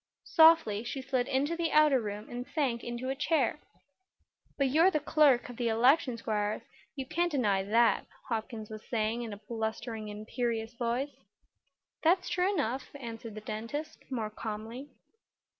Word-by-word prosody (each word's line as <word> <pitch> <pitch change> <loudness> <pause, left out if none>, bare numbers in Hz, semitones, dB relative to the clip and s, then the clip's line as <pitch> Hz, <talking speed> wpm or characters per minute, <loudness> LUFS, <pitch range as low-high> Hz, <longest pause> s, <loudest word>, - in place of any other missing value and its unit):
Softly 320 -10 +6
she 245 +3 -4
slid 260 -1 -1
into 280 +5 0
the 335 -1 -1
outer 300 -4 +5
room 210 0 -5
and 245 +1 -6
sank 260 -7 0
into 240 +2 -4
a 270 - -1
chair. 300 -1 +1 1.0
"But 275 -2 +2
you're 325 +7 +5
the 310 - 0
clerk 290 -4 +4
of 245 -2 -9
the 240 - 0
election, 245 +3 +3
Squiers; 215 -1 -1 0.3
you 270 -2 -4
can't 345 +5 0
deny 210 -9 +2
that," 225 +4 +3 0.2
Hopkins 220 -2 -4
was 215 0 -8
saying 225 0 0
in 230 -2 -5
a 205 - -6
blustering, 220 0 -4
imperious 225 +2 -3
voice. 240 +4 -1 0.9
"That's 360 +3 +3
true 360 +2 +2
enough," 260 - -2
answered 230 -4 -7
the 215 - -7
dentist, 230 +10 -5
more 225 -5 -3
calmly. 225 +5 -6
240 Hz, 155 wpm, -31 LUFS, 220-285 Hz, 1.0 s, Softly